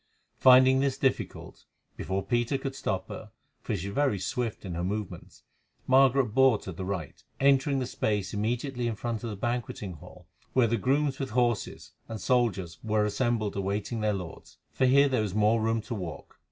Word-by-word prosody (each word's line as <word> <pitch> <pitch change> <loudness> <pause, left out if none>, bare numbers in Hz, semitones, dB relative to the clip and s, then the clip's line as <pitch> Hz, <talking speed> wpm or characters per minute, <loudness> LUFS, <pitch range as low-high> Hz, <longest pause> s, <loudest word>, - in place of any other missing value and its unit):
Finding 130 0 +7
this 135 -1 0
difficult, 135 -2 -2 0.3
before 95 +1 -3
Peter 120 +2 0
could 135 0 -5
stop 95 -8 -2
her, - - -8 0.3
for - - -2
she 100 +1 -4
was - - -7
very 140 -5 +1
swift 115 +3 -3
in 90 - -5
her 85 +1 -3
movements, 100 +1 -5 0.4
Margaret 130 -3 +4
bore 130 -3 +5
to 95 - -7
the 95 +2 -6
right, 95 -6 -5 0.2
entering 140 0 +3
the 130 - -1
space 105 -5 -2
immediately 120 +4 -2
in 115 - -2
front 115 +1 -4
of 115 - -3
the 105 - -5
banqueting 115 -3 -3
hall 80 - -14 0.3
where 130 -2 +4
the 115 +1 +1
grooms 135 +4 0
with 135 -2 -3
horses 120 -2 -1 0.2
and 110 -1 -5
soldiers 100 - 0
were 110 -1 +1
assembled 110 -1 -1
awaiting 100 +3 -2
their 105 0 +2
lords, 90 -4 -8
for 130 - +2
here 140 +2 +5
there 130 -4 +1
was 105 -3 -3
more 110 +2 +3
room 115 0 0
to 115 - -6
walk. 90 -8 -7
115 Hz, 185 wpm, -28 LUFS, 100-130 Hz, 0.4 s, Finding